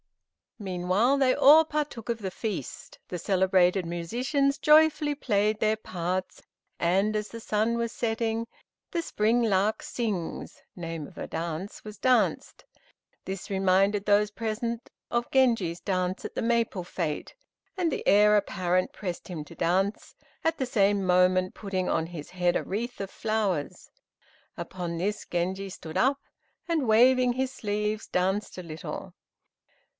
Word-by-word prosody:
Meanwhile, 190 Hz, +6 st, +1 dB
they 260 Hz, -2 st, +4 dB
all 305 Hz, +3 st, +7 dB
partook 300 Hz, -7 st, -4 dB
of 230 Hz, -1 st, -1 dB
the 190 Hz, -3 st, -4 dB
feast; 195 Hz, -, -5 dB
the 180 Hz, -, -5 dB
selected 185 Hz, 0 st, +3 dB
musicians 250 Hz, -, 0 dB
joyfully 300 Hz, -1 st, +5 dB
played 215 Hz, -5 st, +1 dB
their 215 Hz, 0 st, +2 dB
parts, 185 Hz, -2 st, -4 dB, 0.4 s
and 195 Hz, +5 st, +2 dB
as 210 Hz, 0 st, -2 dB
the 230 Hz, -, -8 dB
sun 220 Hz, +1 st, 0 dB
was 235 Hz, -1 st, -1 dB
setting, 225 Hz, 0 st, -1 dB, 0.4 s
"The 340 Hz, -1 st, -1 dB
Spring 230 Hz, -2 st, +1 dB
lark 210 Hz, 0 st, +1 dB
Sings" 210 Hz, -8 st, -4 dB
(name 165 Hz, -4 st, -5 dB
of -, -, -17 dB
a -, -, -4 dB
dance) 165 Hz, +4 st, -5 dB
was 210 Hz, -1 st, -9 dB
danced. 255 Hz, -1 st, +1 dB, 0.6 s
This 190 Hz, -1 st, -6 dB
reminded 195 Hz, +1 st, +2 dB
those 210 Hz, 0 st, +4 dB
present 230 Hz, +2 st, -3 dB, 0.2 s
of 240 Hz, 0 st, 0 dB
Genji's 230 Hz, -11 st, +2 dB
dance 185 Hz, -1 st, -2 dB
at -, -, -6 dB
the -, -, -1 dB
maple 230 Hz, -5 st, +1 dB
fête, 165 Hz, -4 st, -4 dB, 0.4 s
and 345 Hz, -3 st, +1 dB
the -, -, -4 dB
Heir 210 Hz, +1 st, +6 dB
apparent 185 Hz, -2 st, 0 dB
pressed 180 Hz, -4 st, -5 dB
him 170 Hz, -5 st, -5 dB
to 170 Hz, -, -13 dB
dance, 190 Hz, +5 st, 0 dB, 0.3 s
at 325 Hz, 0 st, +1 dB
the 265 Hz, -, -1 dB
same 205 Hz, -4 st, +2 dB
moment 185 Hz, 0 st, +3 dB
putting 190 Hz, -3 st, -3 dB
on 160 Hz, -, 0 dB
his 165 Hz, -4 st, -9 dB
head 180 Hz, -1 st, +1 dB
a -, -, 0 dB
wreath 235 Hz, +5 st, -4 dB
of 195 Hz, -, -4 dB
flowers. 210 Hz, -9 st, -2 dB, 0.7 s
Upon 175 Hz, -2 st, -5 dB
this 205 Hz, +5 st, -2 dB
Genji 190 Hz, +3 st, -2 dB
stood 160 Hz, -3 st, -7 dB
up, 275 Hz, +2 st, +3 dB, 0.5 s
and 320 Hz, -7 st, 0 dB
waving 250 Hz, +3 st, +5 dB
his 260 Hz, +1 st, -1 dB
sleeves, 210 Hz, -2 st, -2 dB
danced 190 Hz, +3 st, -1 dB
a -, -, -6 dB
little. 160 Hz, -1 st, -7 dB
205 Hz, 145 wpm, -27 LUFS, 180-235 Hz, 0.7 s, all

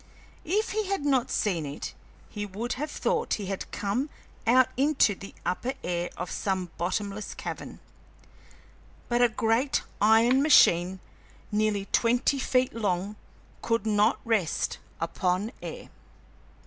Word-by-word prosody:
If 420 Hz, +7 st, 0 dB
he 430 Hz, -1 st, -1 dB
had 390 Hz, -7 st, -1 dB
not 265 Hz, -4 st, +2 dB
seen 180 Hz, -7 st, 0 dB
it, 145 Hz, 0 st, -6 dB, 0.3 s
he 205 Hz, -, -5 dB
would 210 Hz, +5 st, -3 dB
have 300 Hz, +4 st, -4 dB
thought 475 Hz, -1 st, 0 dB
he 205 Hz, -, -5 dB
had 195 Hz, 0 st, -4 dB
come 230 Hz, +9 st, -1 dB, 0.4 s
out 255 Hz, +2 st, +5 dB
into 275 Hz, -5 st, +3 dB
the 195 Hz, +1 st, -11 dB
upper 250 Hz, +9 st, -1 dB
air 175 Hz, 0 st, -1 dB
of 180 Hz, -, -4 dB
some 190 Hz, -3 st, -2 dB
bottomless 200 Hz, +4 st, -3 dB
cavern. -, -, -6 dB, 1.3 s
But 240 Hz, 0 st, +2 dB
a 245 Hz, -, +6 dB
great 225 Hz, +5 st, +1 dB, 0.2 s
iron 225 Hz, +5 st, +5 dB
machine 185 Hz, -, +5 dB, 0.5 s
nearly 210 Hz, -1 st, +1 dB
twenty 245 Hz, +4 st, +2 dB
feet 255 Hz, -1 st, +1 dB
long 200 Hz, -2 st, -1 dB, 0.5 s
could 230 Hz, -2 st, 0 dB
not 210 Hz, +1 st, +3 dB
rest 215 Hz, -8 st, 0 dB, 0.2 s
upon 180 Hz, +5 st, -1 dB
air! -, -, -7 dB
220 Hz, 130 wpm, -27 LUFS, 195-255 Hz, 1.3 s, a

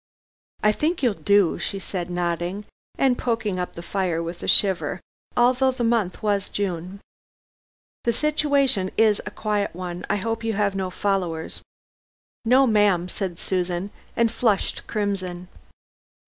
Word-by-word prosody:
"I 210 Hz, -, +6 dB
think 310 Hz, +8 st, -1 dB
you'll 240 Hz, -4 st, +4 dB
do," 200 Hz, -3 st, +3 dB
she 200 Hz, -, -3 dB
said 180 Hz, -2 st, -4 dB
nodding, 175 Hz, +3 st, -2 dB, 0.3 s
and 260 Hz, -2 st, +2 dB
poking 225 Hz, -6 st, -1 dB
up 180 Hz, -, -4 dB
the 170 Hz, -, -7 dB
fire, 175 Hz, -2 st, -1 dB
with 170 Hz, +1 st, -6 dB
a -, -, -5 dB
shiver, 190 Hz, -3 st, +3 dB, 0.4 s
although 255 Hz, +2 st, +4 dB
the 255 Hz, -2 st, -2 dB
month 230 Hz, -6 st, 0 dB
was 205 Hz, -1 st, 0 dB
June. 185 Hz, 0 st, -3 dB, 1.0 s
"The 235 Hz, -, +4 dB
situation 280 Hz, -7 st, +2 dB
is 215 Hz, -2 st, +4 dB
a -, -, -1 dB
quiet 210 Hz, -4 st, -2 dB
one. 180 Hz, -1 st, -5 dB
I -, -, +2 dB
hope 225 Hz, +3 st, -2 dB
you 225 Hz, -1 st, 0 dB
have 205 Hz, -1 st, +1 dB
no 190 Hz, -1 st, -1 dB
followers." 180 Hz, -4 st, -2 dB, 0.8 s
"No, 255 Hz, +4 st, +5 dB
ma'am," 205 Hz, -6 st, +3 dB
said 185 Hz, -4 st, -4 dB
Susan 180 Hz, +1 st, -1 dB, 0.2 s
and 235 Hz, -1 st, +3 dB
flushed 220 Hz, -5 st, 0 dB
crimson. 190 Hz, -4 st, -2 dB
200 Hz, 145 wpm, -24 LUFS, 180-225 Hz, 1.0 s, I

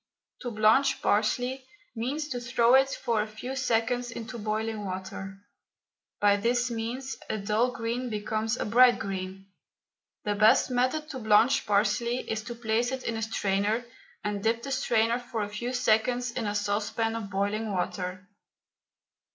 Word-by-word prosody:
To 245 Hz, -, -3 dB
blanch 225 Hz, +5 st, +3 dB
parsley 245 Hz, +5 st, +1 dB, 0.3 s
means 275 Hz, +7 st, -2 dB
to 245 Hz, -, -3 dB
throw 235 Hz, 0 st, +3 dB
it 270 Hz, +1 st, +6 dB
for 235 Hz, -5 st, 0 dB
a 210 Hz, -, -3 dB
few 220 Hz, +5 st, -6 dB
seconds 245 Hz, -1 st, 0 dB
into 235 Hz, +1 st, -7 dB
boiling 215 Hz, 0 st, -2 dB
water. 195 Hz, 0 st, -6 dB, 0.8 s
By 205 Hz, 0 st, +4 dB
this 240 Hz, +3 st, +1 dB
means 240 Hz, +4 st, -4 dB
a -, -, -1 dB
dull 215 Hz, +4 st, +1 dB
green 240 Hz, +1 st, -3 dB
becomes 220 Hz, +2 st, -1 dB
a -, -, -2 dB
bright 245 Hz, +3 st, +6 dB
green. 195 Hz, -1 st, -5 dB, 0.8 s
The 210 Hz, -, 0 dB
best 215 Hz, +5 st, +4 dB
method 255 Hz, +5 st, +1 dB
to 265 Hz, -, -5 dB
blanch 220 Hz, +2 st, +4 dB
parsley 235 Hz, +4 st, +1 dB
is 220 Hz, -1 st, -2 dB
to 240 Hz, 0 st, -6 dB
place 235 Hz, +1 st, 0 dB
it 260 Hz, -1 st, -4 dB
in 230 Hz, -, -2 dB
a 225 Hz, -, -3 dB
strainer 210 Hz, +1 st, 0 dB, 0.4 s
and 205 Hz, -1 st, -2 dB
dip 230 Hz, +2 st, 0 dB
the 275 Hz, -, -5 dB
strainer 235 Hz, -3 st, +2 dB
for 235 Hz, -3 st, -4 dB
a 205 Hz, -, -4 dB
few 235 Hz, +4 st, -4 dB
seconds 245 Hz, 0 st, +1 dB
in 235 Hz, -3 st, -3 dB
a 205 Hz, -, -2 dB
saucepan 215 Hz, +2 st, -1 dB
of 220 Hz, -3 st, -5 dB
boiling 205 Hz, +2 st, -1 dB
water. 185 Hz, 0 st, -3 dB
225 Hz, 160 wpm, -28 LUFS, 210-245 Hz, 0.8 s, it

